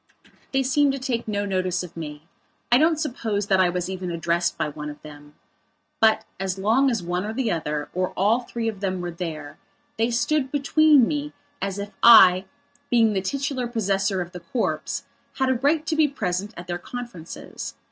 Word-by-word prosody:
They 270 0 +2
seemed 275 +2 +3
to - - -2
take 250 -4 -2
no 205 -1 -1
notice 185 -2 -1
of 175 -2 -10
me; 150 -2 -7 0.5
I 245 - +6
don't 315 0 +3
suppose 225 -8 -2
that 195 -2 +2
I 185 -1 +4
was 180 0 -2
even 185 -1 -4
addressed 170 +1 0
by - - 0
one 150 0 -6
of 145 0 -9
them. 145 -1 -13 0.6
But, 220 -1 +4
as 190 -1 -2
long 230 +8 +3
as 225 -7 -1
one 180 +1 -2
or 215 +1 -4
the 245 -1 -1
other, 150 -3 -2
or 185 +1 0
all 210 +5 +3
three 235 -2 -4
of 215 -3 -3
them 190 -2 -2
were 175 0 -4
there, 155 -4 -6 0.4
they 230 +1 +2
stood 260 +3 0
between 290 -2 +4
me 295 -1 -3 0.3
as 195 0 -2
if, 200 +1 -5
I 190 -5 +8 0.4
being 225 -3 +4
the 190 - 0
titular 265 +4 -2
possessor 195 -4 0
of 175 0 -6
the 180 - -8
corpse, 175 +8 -2 0.3
had 265 -1 +1
a - - +4
right 290 +5 +1
to 325 - -1
be 310 -1 +4
present 200 -5 -3
at 175 - -7
their 175 -1 -4
conferences. 235 -6 -8
200 Hz, 195 wpm, -24 LUFS, 180-250 Hz, 0.6 s, I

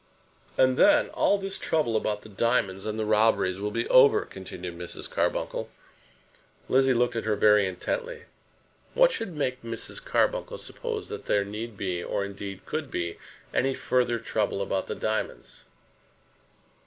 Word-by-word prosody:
"And 130 0 +4
then 295 0 +5
all 205 - +2
this 195 0 -5
trouble 150 -8 0
about 105 -1 -1
the 110 - -12
diamonds 100 -2 0
and 110 0 -3
the 110 - -1
robberies 105 -3 +3
will 105 +1 -2
be 115 +2 -2
over," 130 +2 +6
continued 90 -2 -8
Mrs. 90 0 -6
Carbuncle. - - -1 1.0
Lizzie 135 0 +4
looked 120 0 +1
at 115 - -2
her 110 -1 +1
very 105 -1 +5
intently. 465 - -4 0.7
What - - +6
should 200 - -4
make 130 -4 -1
Mrs. 115 -1 -5
Carbuncle - - 0
suppose - - -5
that - - -7
there 100 -1 +2
need 105 +2 -6
be, 90 -3 -2
or, 100 - -2
indeed, 100 -1 -7
could 155 -3 -3
be, 85 -6 -3 0.3
any 135 0 +1
further 125 -2 +1
trouble 110 -3 -1
about 95 -1 -1
the - - -3
diamonds? 110 0 -4
110 Hz, 155 wpm, -27 LUFS, 100-130 Hz, 1.0 s, over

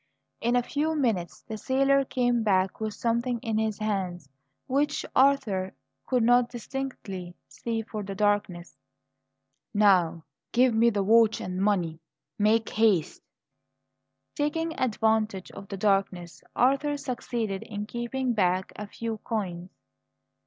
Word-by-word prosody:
In 240 +1 +1
a 245 - +3
few 310 +5 -1
minutes 225 - -1
the 220 -1 -7
sailor 275 +3 +3
came 245 -3 +1
back 190 -3 +1
with 215 -1 -3
something 235 +1 0
in 220 -1 0
his 220 -2 -1
hands 185 -7 -3 0.4
which 290 +3 0
Arthur 220 -9 +2 0.3
could 250 -3 +2
not 245 +1 +4
distinctly 230 -8 -6
see 225 -1 -4
for 215 -1 -6
the 195 -1 -6
darkness. 205 -4 0 1.0
"Now, 180 -6 +4 0.3
give 245 0 +4
me 230 +2 +4
the 205 -3 0
watch 225 +2 +4
and 180 0 -4
money. 180 -6 +1 0.4
Make 215 +1 +3
haste!" 205 -7 +2 1.1
Taking 320 +2 -1
advantage 220 -5 0
of 195 - -10
the 195 - -6
darkness, 195 -3 0
Arthur 275 +3 +2
succeeded 235 -7 -3
in 210 -1 -5
keeping 240 +3 -2
back 185 -3 +1
a 210 - -6
few 225 +1 -5
coins. 185 -6 -4
220 Hz, 130 wpm, -27 LUFS, 195-245 Hz, 1.1 s, not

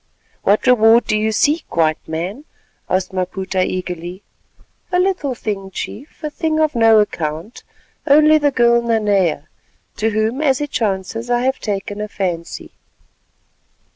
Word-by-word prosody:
"What 205 +2 +2
reward 230 -1 +5
do - - 0
you 215 +1 +1
seek, 295 - 0
White 155 -1 +1
Man?" 180 - -5 0.4
asked 185 +1 -1
Maputa 185 0 -2
eagerly. 180 +1 -5 0.7
"A 360 - +2
little 360 -8 0
thing, 200 -4 -4
Chief, 270 - -8
a 305 - -3
thing 315 0 -1
of 310 -1 +2
no 225 -2 +5
account, 165 0 -3 0.5
only 305 +2 +6
the 290 -1 +3
girl 235 -3 +3
Nanea, 205 -9 +1 0.5
to 220 +1 +1
whom 220 +5 -1
as 270 -4 +2
it 295 -1 -4
chances 225 +2 -2
I 240 0 +2
have 265 +1 0
taken 205 0 -4
a 210 - -3
fancy." 180 -5 -4
215 Hz, 140 wpm, -18 LUFS, 185-260 Hz, 0.7 s, only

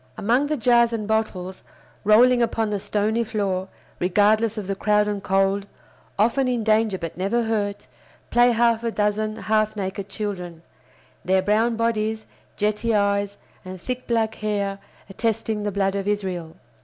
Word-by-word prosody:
Among 245 +7 +2
the 305 0 -1
jars 235 -1 +4
and 215 -2 -3
bottles, 190 -4 -2 0.4
rolling 240 +4 +5
upon 225 -2 0
the 205 - -1
stony 210 +3 0
floor, 200 -4 -2 0.3
regardless 210 +4 +2
of 210 - -4
the 195 - -2
crowd 210 +1 +2
and 205 -1 -2
cold, 195 +1 +1 0.5
often 240 +6 +2
in 245 -3 0
danger 215 -2 +2
but 170 -2 -6
never 230 +6 +1
hurt, 205 -2 -2 0.5
play 240 +1 +5
half 235 0 +2
a 230 - 0
dozen 215 0 -1
half 215 -1 0
naked 195 0 -4
children, 180 -5 -5 0.6
their 190 0 +2
brown 220 +4 +2
bodies, 220 -1 -1 0.3
jetty 215 +2 0
eyes, 200 0 +1 0.3
and 185 -1 -8
thick 250 +7 -5
black 225 -2 +1
hair 200 -2 -2 0.3
attesting 220 +1 -2
the 205 0 -2
blood 195 0 0
of 200 0 -3
Israel. 185 -5 -3
210 Hz, 155 wpm, -23 LUFS, 200-225 Hz, 0.6 s, rolling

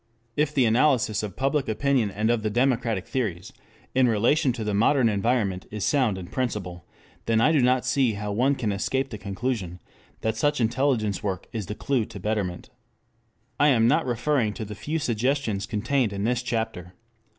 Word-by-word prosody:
If 150 0 +1
the 135 -4 +3
analysis 115 -2 +2
of 105 -4 -6
public 135 0 0
opinion 125 -1 +1
and 105 +4 0
of 120 -2 +1
the 110 - -1
democratic 115 -4 +1
theories 100 -9 -3 0.4
in 130 -1 +4
relation 120 +6 +2
to 115 -2 -5
the 105 -1 -2
modern 115 +5 +3
environment 105 -3 0
is 105 -2 -5
sound 125 -9 +2
in 95 - -6
principle, 100 -6 -4 0.4
then 115 -1 +3
I 150 - +4
do 155 - +3
not 125 0 +2
see 125 -2 +2
how 105 0 -4
one 130 +7 +2
can 115 -6 -1
escape 130 +7 -1
the 105 - -6
conclusion 100 -3 -3 0.4
that 110 0 -1
such 145 +5 +1
intelligence 115 -4 +1
work 100 -3 -3
is 110 -5 -4
the 105 - -4
clue 130 -3 0
to 100 - -10
betterment. 95 -3 -3 0.9
I 145 - +5
am 115 -5 +4
not 150 +3 +2
referring 120 -3 0
to 110 - -5
the 105 - -7
few 145 +10 -3
suggestions 120 -6 -1
contained 115 +1 0
in 100 0 -3
this 120 +2 +1
chapter. 110 -7 -4
115 Hz, 185 wpm, -25 LUFS, 105-130 Hz, 0.9 s, I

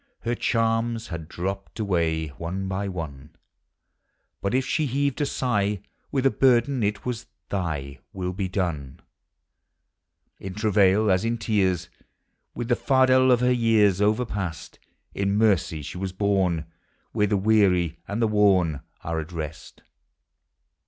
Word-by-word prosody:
ller 120 - +1
charms 115 0 0
had 85 -3 -6
dropped 95 +6 -5
away 85 -6 0
One 85 +8 -5
by 95 +1 -2
one; 75 -6 -7 1.1
But 100 +5 0
if 130 0 +1
she 155 +2 0
heaved 140 +2 0
a 145 - +1
sigh 105 -7 0 0.3
With 135 -2 0
a 135 - +5
burden, 130 0 +3
it 105 0 -1
was, 120 -2 -4
" - - -53
Thy 75 -8 -3
Will 90 -1 -3
be 95 0 -3
done/' 80 -9 -3 1.4
In 95 -1 -7
travail, 105 -1 +3
as 95 +2 +2
in 115 +1 0
tears, 100 -6 0 0.7
With 120 - -4
the 120 - +4
fardel 130 0 +4
of 125 -1 +4
her 125 0 +3
years 110 -5 +3
Overpast, 105 -6 -1 0.3
In 100 +1 0
mercy 95 -8 +2
she 90 - -7
was 95 -1 -3
borne 95 -5 +1 0.5
Where 105 -2 +1
the 100 0 +1
weary 95 -5 +2
and 110 +3 -1
the - - +4
worn 95 -8 +3 0.2
Are 80 0 -2
at 80 +2 -6
rest. 80 -2 -7
100 Hz, 145 wpm, -25 LUFS, 90-115 Hz, 1.4 s, a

